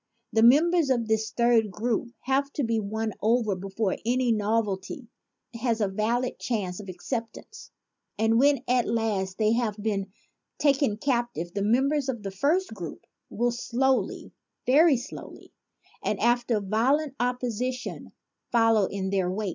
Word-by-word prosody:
The 220 - +3
members 310 +6 +5
of 240 -4 +1
this 220 0 0
third 235 -2 +2
group 230 +5 -1
have 275 +2 0
to 290 - -1
be 230 -1 +1
won 220 +1 -3
over 225 -1 +2
before 195 +2 -2
any 245 +1 +1
novelty 215 +1 -1 0.5
has 230 -1 -1
a 210 - +2
valid 225 +6 -1
chance 200 -6 -2
of 200 -2 -9
acceptance; 245 - -6 0.5
and 225 +1 +3
when 280 -1 +3
at 250 -1 +2
last 205 -5 -1
they 215 -1 +2
have 230 -3 -1
been 200 -2 -2 0.5
taken 275 -7 +2
captive, 240 - -2
the 200 - -2
members 270 +6 +2
of 235 -5 -3
the 195 - -4
first 290 - 0
group 175 -7 -8 0.2
will 240 +2 0
slowly, 245 -2 -1 0.3
very 290 +2 +5
slowly, 245 - -10 0.5
and - - -1
after 240 -2 +2
violent 255 +9 +1
op 250 +1 0
position, 250 +1 -4 0.4
follow 225 -3 +4
in 190 -1 -3
their 190 -2 +1
wake. 200 +2 -2
230 Hz, 145 wpm, -26 LUFS, 210-255 Hz, 0.5 s, members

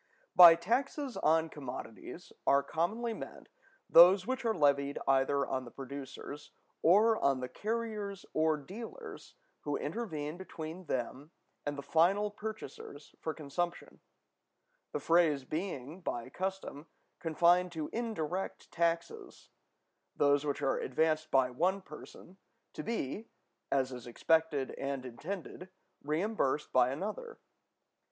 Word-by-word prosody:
By 170 -2 +11
taxes 255 - -1
on 160 +1 +3
commodities 130 -6 -8
are 140 0 +5
commonly 215 - -1
meant - - -9 0.4
those 185 +3 +8
which 260 +2 -2
are 225 -2 0
levied 140 -1 +2
either 135 +1 +3
on 130 0 -2
the 120 - -9
producers, 140 +2 -8 0.3
or 215 +6 +5
on 135 -2 +3
the 125 - -3
carriers 210 - -4
or 155 0 +2
dealers 230 - -9 0.2
who - - -2
intervene 160 -9 -4
between 175 -1 -7
them 130 +2 -3 0.4
and 145 0 -2
the 140 - -5
final 195 +8 +3
purchasers 205 -9 -8
for 160 - -3
consumption; 170 +4 -4 0.9
the - - -2
phrase 165 -5 +3
being, 155 0 -4
by 120 -7 -4
custom, 185 -3 -4 0.3
confined 175 +2 +3
to 155 -2 -4
indirect 195 -6 -3
taxes—those 165 -3 -2
which 145 - -2
are 135 - +1
advanced 155 +3 0
by 130 -3 +3
one 180 +9 +1
person, 180 +1 -13 0.4
to - - -5
be, 220 - -3 0.4
as 135 -1 +1
is 125 -2 -8
expected 155 +2 +1
and 135 -1 -3
intended, 180 +8 -7 0.3
reimbursed 155 -1 -1
by 125 -1 +5
another. 215 - -5
160 Hz, 120 wpm, -32 LUFS, 140-195 Hz, 0.9 s, By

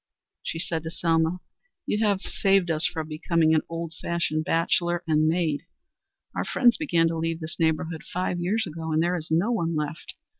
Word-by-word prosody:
She - - -4
said 165 0 -2
to 160 - -5
Selma: 165 +1 +1 0.4
"You 210 +2 0
have 200 -2 +1
saved 195 -3 +2
us 155 0 +2
from 160 -3 -4
becoming 160 +1 +2
an 155 - +4
old 165 -1 -4
fashioned 155 -2 -1
bachelor 175 +1 +1
and 155 -1 +3
maid. 160 -1 0 0.7
Our - - -1
friends 240 -3 +4
began 170 - +2
to 165 - -2
leave 165 0 -1
this 160 0 -6
neighborhood 160 0 0
five 180 0 -1
years 205 +6 0
ago, 160 -1 -5
and 155 +1 +2
there 175 +1 +1
is 160 -3 -5
no 170 +9 +2
one 170 -8 0
left. 150 +1 -4
165 Hz, 185 wpm, -26 LUFS, 160-175 Hz, 0.7 s, an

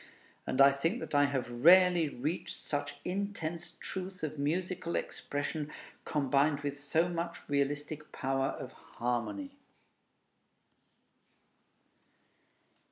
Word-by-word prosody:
And 130 - -1
I 140 0 +9
think 165 - 0
that - - -7
I 145 0 +6
have 135 -4 -1
rarely 170 +6 +6
reached 145 +7 -3
such 145 0 -3
intense 180 -3 -3
truth 185 -2 -5
of 155 -1 -3
musical 170 +3 -1
expression, 145 +1 -3 0.3
combined 145 0 +2
with 140 -1 -2
so 145 +4 +1
much 170 -1 -4
realistic 145 +2 -1
power 135 0 0
of - - -5
harmony. 125 - -3
150 Hz, 100 wpm, -32 LUFS, 140-175 Hz, 0.3 s, I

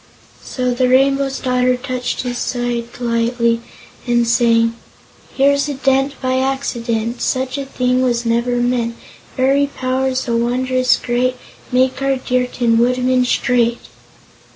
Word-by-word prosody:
So 250 -1 -2
the 250 +1 +1
Rainbow's 270 +1 +2
Daughter 250 0 +1
touched 250 0 -3
his 245 -1 -3
side 240 -1 -2
lightly 235 0 0 0.5
and 240 -1 +2
sang: 230 -1 +3 0.6
"Here's 280 +2 +3
a 285 - -3
dent 270 +1 0
by 260 0 0
accident; 240 -4 -2
Such 260 0 -1
a 280 -1 -4
thing 250 -1 0
was 240 -2 0
never 235 +1 +1
meant. 240 -1 0 0.4
Fairy 275 +2 +3
Powers, 260 -1 -1
so 235 - -2
wondrous 255 +1 +1
great, 250 +1 -1 0.4
Make 255 +1 +1
our 275 0 +1
dear 250 -1 -1
Tin 235 -2 +1
Woodman 250 +1 +2
straight!" 240 -1 +1
250 Hz, 130 wpm, -18 LUFS, 240-260 Hz, 0.6 s, sang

